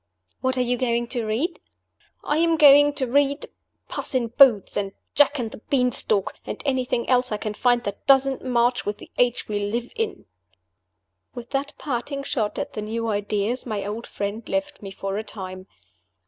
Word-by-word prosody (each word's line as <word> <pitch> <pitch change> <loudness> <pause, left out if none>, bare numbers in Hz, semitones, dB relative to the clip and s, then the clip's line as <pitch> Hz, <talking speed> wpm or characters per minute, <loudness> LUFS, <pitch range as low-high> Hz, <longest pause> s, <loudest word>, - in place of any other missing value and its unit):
"What 260 0 -1
are - - +2
you 245 0 0
going 240 -1 0
to 235 -4 -2
read?" 240 - -1 0.6
"I 295 +2 0
am 330 -1 +3
going 290 -1 +7
to 265 - -1
read 280 +3 +1 0.4
Puss - - -4
in 240 -3 +1
Boots, 240 -5 +5
and 195 -1 -2 0.2
Jack 290 0 +4
and 230 -4 -3
the - - -10
Bean 250 -3 +3
stalk, 205 -4 0
and - - -6
anything 255 -3 0
else 250 -1 +2
I 210 - 0
can 210 0 -4
find 245 +2 +2
that 200 +3 -6
doesn't 270 -1 +4
march 245 -1 +1
with 205 0 -3
the - - -14
age 245 -1 +2
we 210 -1 -1
live 230 +4 -3
in." 450 -2 -3 1.1
With 240 -1 -8
that 275 +1 -2
parting 275 +1 -3
shot 220 -7 -2
at - - -4
the 215 - -4
new 225 +2 -3
ideas, 210 +4 -1
my 210 -3 -3
old 215 +3 -5
friend 205 +3 -5
left 290 0 -2
me 200 - -7
for 195 +1 -4
a - - -4
time. 185 -3 -8
240 Hz, 190 wpm, -24 LUFS, 210-275 Hz, 1.1 s, going